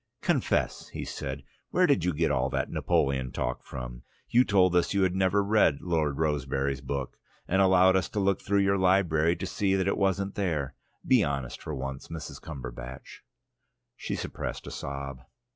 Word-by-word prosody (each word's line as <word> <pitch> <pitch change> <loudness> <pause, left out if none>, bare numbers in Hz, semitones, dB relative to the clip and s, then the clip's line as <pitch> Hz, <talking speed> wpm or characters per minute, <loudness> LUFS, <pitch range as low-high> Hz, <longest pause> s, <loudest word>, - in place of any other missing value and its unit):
"Confess!" - - 0
he - - -6
said. 70 0 -5 0.3
"Where 180 - +3
did 140 - +3
you 90 - +2
get 80 +1 +1
all 65 +1 +1
that - - -2
Napoleon 65 -2 +1
talk - - -3
from? - - -7 0.3
You 125 +2 +5
told 95 -5 +3
us 90 +3 +2
you 100 - +3
had 95 -1 +2
never 95 +1 +2
read 100 -8 +3
Lord 80 -5 0
Rosebery's 70 -3 -1
book, 70 -1 -4 0.3
and 95 +2 +2
allowed 95 0 +5
us 95 - +1
to 105 - -3
look 100 -1 +1
through 100 0 +2
your 100 0 +2
library 85 -3 +3
to - - -5
see 95 -2 0
that 95 0 +1
it - - 0
wasn't 100 0 +1
there. 75 -9 -1 0.3
Be 125 -5 +5
honest 70 -5 -3
for 75 - -5
once, 65 0 -5
Mrs. 80 -3 -7
Cumberbatch." 65 -3 -8 0.8
She - - -4
suppressed - - -5
a - - -7
sob. 70 -2 -6
80 Hz, 175 wpm, -28 LUFS, 70-95 Hz, 0.8 s, You